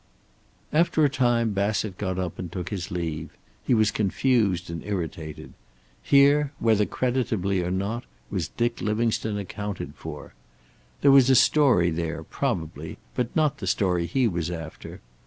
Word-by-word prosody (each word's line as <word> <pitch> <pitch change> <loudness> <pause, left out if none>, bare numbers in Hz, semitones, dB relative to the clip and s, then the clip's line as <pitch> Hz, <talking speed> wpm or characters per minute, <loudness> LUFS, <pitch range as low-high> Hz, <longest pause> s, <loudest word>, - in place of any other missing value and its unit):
After 160 -1 +3
a - - +3
time 120 -4 +2
Bassett 100 0 -1
got 95 -3 -2
up 90 -3 -3
and 90 -3 -5
took 90 0 -5
his 95 -3 -4
leave. 80 -2 -3 0.3
He 125 - +2
was 110 -2 +3
confused 105 -3 +1
and 85 -1 -6
irritated. 80 -6 -5 0.5
Here, 140 +1 +4
whether 110 -2 +2
creditably 110 -7 0
or 90 - -2
not, 100 +6 -2 0.3
was - - -1
Dick 120 0 -2
Livingstone 110 -1 0
accounted 100 -6 -5
for. 75 -1 -9 0.7
There 140 - +6
was 135 -2 +7
a 130 - +6
story 125 - +4
there, 80 0 -3
probably, 80 -1 -3 0.2
but 125 -2 -2
not 155 -3 +2
the 95 - -5
story 90 -2 +1
he 125 +8 +2
was 85 -4 -2
after. 80 -2 -8
100 Hz, 150 wpm, -25 LUFS, 85-120 Hz, 0.7 s, was